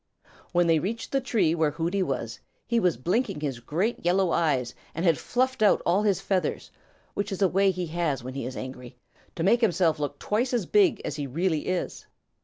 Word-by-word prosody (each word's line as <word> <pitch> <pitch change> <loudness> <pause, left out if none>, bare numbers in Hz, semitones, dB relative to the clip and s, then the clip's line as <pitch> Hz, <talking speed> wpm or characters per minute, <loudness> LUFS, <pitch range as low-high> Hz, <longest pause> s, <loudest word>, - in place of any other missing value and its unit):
When 175 0 +3
they 165 -1 +4
reached 225 +8 -4
the 275 - +1
tree 210 -10 +1
where 160 -2 +2
Hooty 170 +6 -1
was, 120 -8 -3 0.3
he 235 0 +1
was 180 - +2
blinking 190 - 0
his 135 -5 -3
great 180 - -2
yellow 180 +1 +2
eyes 135 -7 +1 0.2
and 165 +3 -2
had 165 -2 +5
fluffed 260 0 0
out 210 - +5
all 180 +4 +3
his 200 -4 +2
feathers, 195 -1 -2 0.4
which 205 0 -3
is 195 +1 -1
a - - +6
way 195 +2 +3
he 185 -1 -2
has 160 -6 -2
when 130 +1 -6
he 135 -3 -4
is 130 - -7
angry, 125 -1 -8 0.4
to 165 - -2
make 235 +7 +4
himself 175 -7 +2
look 145 -1 -3
twice 240 - 0
as 225 -6 0
big 395 -6 +3
as 150 - -3
he 145 -2 -3
really 160 +3 -1
is. 185 -1 -3
175 Hz, 210 wpm, -26 LUFS, 150-205 Hz, 0.4 s, a